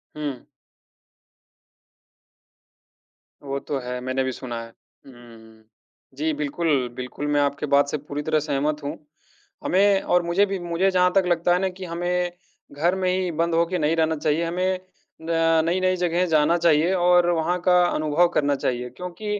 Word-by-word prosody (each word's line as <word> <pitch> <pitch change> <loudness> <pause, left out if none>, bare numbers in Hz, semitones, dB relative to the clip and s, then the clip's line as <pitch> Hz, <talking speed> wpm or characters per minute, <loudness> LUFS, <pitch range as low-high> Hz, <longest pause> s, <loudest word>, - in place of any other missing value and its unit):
हुँ। 145 -4 -5 3.0
वो 140 0 -3
तो 140 0 -4
है, 125 0 -5
मैंने 130 +1 -1
भी 130 - -2
सुना 120 -2 -6
है, 115 - -10 0.4
हुँ, 135 - -14
हुँ। 110 -2 -16 0.5
जी, 155 +2 0
बिल्कुल, 145 -3 -1
बिल्कुल 130 +3 -5
मैं 145 0 +2
आपके 140 +1 -1
बात 140 0 +3
से 150 - -2
पूरी 145 0 -6
तरह 155 -1 +1
सहमत 150 0 -2
हूँ, 140 - -4 0.7
हमें 195 +1 +3
और 180 -1 +1
मुझे 175 +4 +2
भी 195 -1 -4
मुझे 175 +2 0
जहाँ 180 -1 +3
तक 195 - +5
लगता 175 0 +2
है 180 - +2
ना 190 - +1
कि 185 0 -9
हमें 175 +1 -2 0.4
घर 170 +6 +1
में 185 -1 0
ही 185 -1 -1
बंद 165 +1 -1
होके 170 +2 +1
नहीं 155 +2 +1
रहना 160 0 +1
चाहिए। 155 +2 0
हमें 185 +2 -1 0.4
न 165 0 +2
नई-नई 185 +2 +1
जगहें 175 0 +1
जाना 155 +2 +3
चाहिए 170 +1 +3
और 175 -1 +4
वहाँ 170 +2 0
का 180 -1 +5
अनुभव 155 +1 +2
करना 145 -1 +2
चाहिए 125 -2 -2
क्योंकि 205 +4 -4
165 Hz, 165 wpm, -23 LUFS, 145-180 Hz, 3.0 s, तक